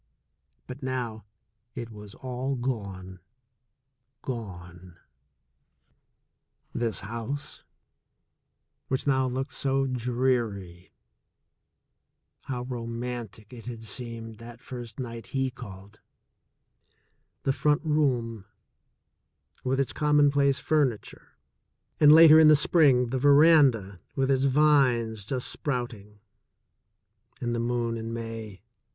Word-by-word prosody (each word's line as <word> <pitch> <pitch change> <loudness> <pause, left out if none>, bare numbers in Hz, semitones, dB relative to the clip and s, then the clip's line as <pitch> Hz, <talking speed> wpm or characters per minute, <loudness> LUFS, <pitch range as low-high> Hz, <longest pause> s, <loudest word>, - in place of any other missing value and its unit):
But 125 - -9
now 125 -5 -4 0.5
it 115 -1 -6
was 105 -2 -11
all 130 +1 -4
gone, 100 -7 -5 1.0
gone! 90 -7 -8 1.8
This 115 -2 -1
house, 115 +7 -6 1.2
which 130 - -2
now 130 -2 +2
looked 130 +3 -3
so 135 0 0
dreary 120 -8 -2 0.7
— - - -42
^how 125 -1 -4
romantic 115 -3 -6
it 120 -1 -11
had 115 -2 -7
seemed 115 0 -6
that 120 0 -11
first 120 -3 -9
night 115 -3 -6
he 135 -1 0
called 105 -4 -12 0.7
— - - -45
the 135 - +1
front 150 +3 +1
room 125 -9 0 1.2
with 130 +1 0
its 135 - -1
commonplace 145 -2 +3
furniture, 140 -8 -2 0.6
and 150 -1 +7
later 160 0 +9
in 160 - +7
the 155 - +8
spring, 140 -5 +4
the 130 +1 -1
veranda, 140 - +5 0.2
with 135 0 +1
its 135 0 +2
vines 130 -6 +3
just 125 +5 -1
sprout 125 -5 -2
ing, 105 0 -16 1.2
and 120 -3 -2
the - - -2
moon 120 -1 -1
in 115 0 -5
May. 115 -4 -7
120 Hz, 105 wpm, -27 LUFS, 110-135 Hz, 1.8 s, later